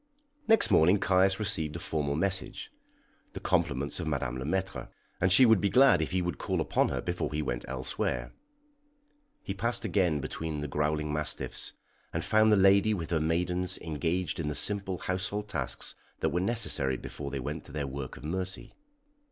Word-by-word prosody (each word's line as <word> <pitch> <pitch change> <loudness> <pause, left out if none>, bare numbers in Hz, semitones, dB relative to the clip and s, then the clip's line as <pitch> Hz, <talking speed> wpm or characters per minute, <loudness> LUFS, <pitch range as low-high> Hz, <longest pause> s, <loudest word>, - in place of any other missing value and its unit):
Next 225 -1 +5
morning 90 +6 +5
Caius 95 +1 +3
received 85 -8 +1
a - - -4
formal 75 -5 -2
message 95 +4 -2 0.6
the - - -6
compliments 70 +6 0
of 85 - -3
Madame 65 -4 -2
Le 65 - -4
Maître, 95 +4 -2 0.3
and 95 +1 +2
she 130 +7 +8
would 110 -4 +5
be 100 - +2
glad 130 -7 +6
if 80 - -1
he 90 -1 0
would 85 -4 -3
call - - -1
upon - - +1
her - - -2
before - - -3
he 75 +1 -1
went - - -3
elsewhere. 65 -2 -2 1.1
He - - -3
passed 115 0 -1
again 90 -6 +1
between 75 +1 -4
the 75 - -3
growling 75 +1 -1
mastiffs, 75 0 -3 0.4
and - - -3
found 110 0 +4
the 105 - +5
lady 100 +2 +5
with 85 -3 -5
her 80 -2 +1
maidens 90 +3 0
engaged 80 +1 -2
in 80 - -2
the 75 - -2
simple 100 -2 -1
household 95 +4 -2
tasks 75 -10 -3 0.3
that - - +2
were 90 - 0
necessary 90 - +1
before 70 +3 -7
they 70 -1 -4
went 75 +4 -5
to - - -12
their 70 0 -3
work 70 -1 -6
of - - -12
mercy. 95 +4 -3
85 Hz, 185 wpm, -29 LUFS, 75-95 Hz, 1.1 s, she